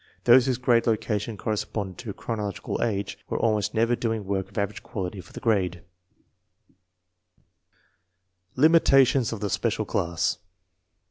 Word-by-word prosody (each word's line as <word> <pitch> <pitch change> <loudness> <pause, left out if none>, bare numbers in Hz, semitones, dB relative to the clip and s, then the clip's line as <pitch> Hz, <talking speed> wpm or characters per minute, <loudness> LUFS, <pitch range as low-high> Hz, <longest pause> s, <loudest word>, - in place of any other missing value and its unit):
Those 125 +2 +6
whose 130 -2 +1
grade 120 -2 +2
location 110 -1 -1
corresponded 100 -3 -3
to 110 -5 -6
chronological 105 -4 -4
age 100 -4 -2
were - - -1
almost 110 -1 0
never 115 +2 +2
doing 115 -3 -2
work 95 -1 -2
of - - -15
average 100 0 -2
quality 95 -1 -5
for 90 - -18
the - - -8
grade. 95 -8 0 2.7
Limitations 135 -4 +4
of 110 -2 -5
the 105 - -1
special - - 0
class. 85 0 -1
110 Hz, 130 wpm, -25 LUFS, 100-120 Hz, 2.7 s, Those